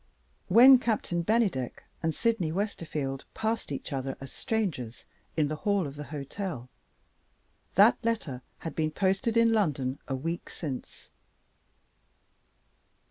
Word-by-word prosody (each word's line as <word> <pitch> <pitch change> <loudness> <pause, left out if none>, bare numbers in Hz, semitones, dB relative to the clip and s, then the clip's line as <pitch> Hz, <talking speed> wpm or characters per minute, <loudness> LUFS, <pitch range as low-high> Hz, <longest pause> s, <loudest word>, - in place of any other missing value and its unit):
When 250 +6 +9
Captain 215 -7 0
Bennydeck 195 - 0 0.2
and 165 -2 0
Sydney 225 -9 +1
Westerfield 155 -8 -3
passed 220 -5 -1
each 140 - -4
other 135 0 -3
as 135 -1 -9
strangers, 165 - -3 0.3
in 155 -2 +3
the 155 +1 -3
hall 200 0 +1
of 140 -1 -6
the 150 0 -6
hotel, 145 - -5 1.1
that 210 +5 +6
letter 215 - -1 0.2
had 165 - -6
been 155 -1 +1
posted 195 +7 +1
in 230 0 +5
London 145 -10 0
a 135 - -1
week 165 +6 -4
since. 140 -6 -7
165 Hz, 125 wpm, -29 LUFS, 140-220 Hz, 1.1 s, When